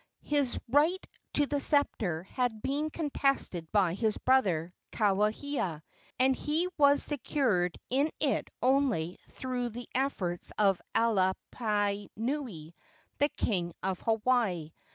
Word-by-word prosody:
His 285 -4 +1
right 295 +9 +3 0.4
to 290 - +3
the 285 0 -1
sceptre 215 - +1
had 225 +1 -2
been 290 +3 -1
contested 275 - -1
by 195 -5 +3
his 215 +2 0
brother, 180 -10 +2 0.2
Kauhia, 210 - 0 0.3
and 260 +1 +3
he 315 +6 -1
was 285 -1 +6
secured 245 - 0
in 280 +4 +2
it 285 -3 0
only 250 - +1
through 250 -2 -3
the 240 +2 -8
efforts 205 -10 -2
of 195 -3 +3
Alapainui, 205 - -1 0.5
the 290 - +3
king 175 -6 -1
of 190 -1 -1
Hawaii. 220 -8 +1
230 Hz, 110 wpm, -30 LUFS, 190-275 Hz, 0.5 s, was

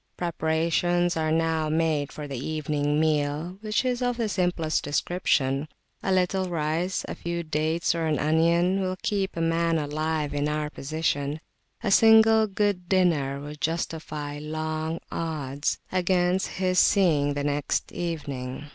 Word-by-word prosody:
Preparations 170 +1 +1
are 155 -1 0
now 160 -1 +1
made 155 -2 0
for 150 -1 -7
the 135 -3 -5
evening 150 -1 -1
meal, 155 +3 0
which 215 +3 0
is 250 0 0
of 245 -1 0
the 230 -2 0
simplest 175 -5 0
description. 145 -2 0 0.3
A 190 - -1
little 185 0 +1
rice, 165 +3 -1
a - - -4
few 170 0 -4
dates, 155 +2 0
or 165 -1 -1
an 155 -2 +1
onion, 170 +5 +2
will 185 -1 -1
keep 195 -3 -1
a - - -1
man 165 0 +1
alive 155 0 -2
in 145 +1 0
our 150 0 -2
position; 145 0 -2 0.4
a 205 - 0
single 220 +1 +6
"good 200 -3 -1
dinner" 160 -8 +2
would 150 +1 -9
justify 155 -3 -3
long 155 +1 -3
odds 145 -4 -2
against 180 0 +1
his 185 -1 +2
seeing 150 -8 +3
the 145 - -2
next 145 0 -1
evening. 145 -5 -5
160 Hz, 145 wpm, -26 LUFS, 150-180 Hz, 0.4 s, single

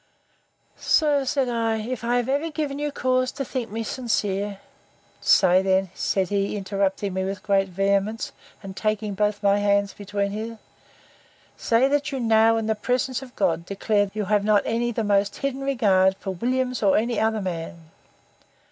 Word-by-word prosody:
Sir, 290 -3 +2
said 265 0 0
I, 230 -2 0
if 235 +2 -5
I 240 +1 +1
have 245 -1 -1
ever 285 +5 0
given 295 -3 -3
you 295 0 -2
cause 255 -2 0
to 275 - -4
think 250 -2 -4
me 225 +2 -4
sincere—Say 200 -5 0
then, 190 -1 +1
said 190 -2 -1
he, 200 0 -1
interrupting 195 0 -1
me 190 0 -1
with 195 +1 -4
great 195 -2 +2
vehemence, 200 +3 0 0.3
and 190 -1 -8
taking 215 0 -1
both 210 +1 -1
my 200 0 +3
hands 200 -1 +1
between 200 0 -3
his, 220 +2 -5 1.0
Say, 235 +3 +2
that 290 +1 0
you 270 - -3
now, 225 -1 +4
in 225 - -2
the 220 - +1
presence 250 +4 -1
of 255 -2 -12
God, 170 -4 0
declare 205 +2 0
that 195 - -18
you 210 -1 -1
have 205 0 +2
not 210 -1 +3
any 235 +1 0
the 225 -1 -2
most 200 -1 +1
hidden 275 -1 -3
regard 195 -8 +2
for 195 - -5
Williams, 250 +5 -1
or 195 -3 +4
any 230 0 0
other 220 -1 +1
man. 165 -2 -6
215 Hz, 175 wpm, -24 LUFS, 195-245 Hz, 1.0 s, now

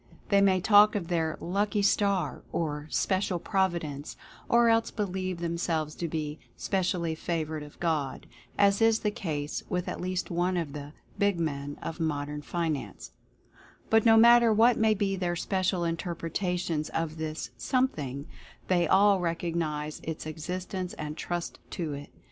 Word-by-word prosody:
They 200 0 +5
may 190 -2 +4
talk 210 +3 +6
of 180 -4 -2
their 160 -2 0
"lucky 205 +3 0
star" 200 -5 +1
or 150 -2 -2
"special 190 +1 0
providence," 170 -6 -1 0.3
or 235 0 +5
else 225 0 +3
believe 185 -3 -3
themselves 170 -2 -1
to 170 - -3
be 155 -1 -4 0.2
"specially 180 -4 0
favored 160 -1 -3
of 150 0 -12
God" 155 -6 -1 0.3
(as 200 0 +4
is 225 0 +4
the 210 - +1
case 150 -8 -3
with 180 -1 -1
at - - -4
least 185 0 -2
one 175 +2 +1
of 160 -5 -3
the 145 0 -7 0.3
"big 200 -3 +2
men" 145 -3 -3
of 165 - -5
modern 150 -2 -2
finance), 160 -3 -3 0.8
but 225 -1 +5
no 225 -1 +6
matter 235 0 +7
what 225 +3 +5
may 220 -1 +3
be 195 -1 0
their 175 -2 -1
special 185 0 0
in 165 0 0
terpretations 175 -2 -2
of 165 -1 -2
this 155 0 -4
"Something," 150 - -1 0.4
they 175 -2 +3
all 200 0 +5
recognize 165 -3 -2
its 160 -1 -5
existence 180 +4 -4
and 150 0 -5
trust 175 +1 -4
to 160 -4 -3
it. 145 0 -7
175 Hz, 155 wpm, -28 LUFS, 155-195 Hz, 0.8 s, matter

